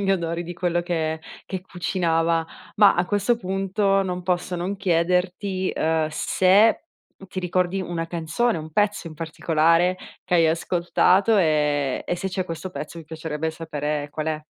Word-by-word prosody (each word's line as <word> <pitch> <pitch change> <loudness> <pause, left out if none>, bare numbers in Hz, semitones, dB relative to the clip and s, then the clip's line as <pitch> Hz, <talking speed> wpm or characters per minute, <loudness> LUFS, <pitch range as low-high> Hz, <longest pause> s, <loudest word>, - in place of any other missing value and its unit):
gli 195 -1 +1
odori 170 -2 -2
di 175 - -6
quello 175 0 0
che 160 -2 -2 0.2
che 190 - -5
cucinava. 170 -3 0 0.3
Ma 205 -1 +7
a 175 - +1
questo 205 +5 +1
punto 195 0 0
non 180 -1 -3
posso 180 0 -1
non 180 +3 -3
chiederti, 185 +1 0
uhm, 160 0 +1
se, 190 - +3 0.3
mhmm, 195 - -12
ti 185 - -4
ricordi 180 +1 0
una 170 -2 -3
canzone 170 +7 -1
o - - -5
un 155 +1 -9
pezzo 205 0 0
in 155 - -11
particolare 165 +2 +2 0.3
che 180 - -1
hai 165 -2 +5
ascoltato 180 +5 +2
e 150 -5 +1
e 175 - -1
se 190 - -3
c'è 185 0 -2
questo 175 +2 -6
pezzo 170 -1 -7
mi 165 - -10
piacerebbe 160 0 -4
sapere 150 -2 -3
qual 155 +1 -4
è. 155 -1 -1
175 Hz, 170 wpm, -23 LUFS, 160-190 Hz, 0.3 s, Ma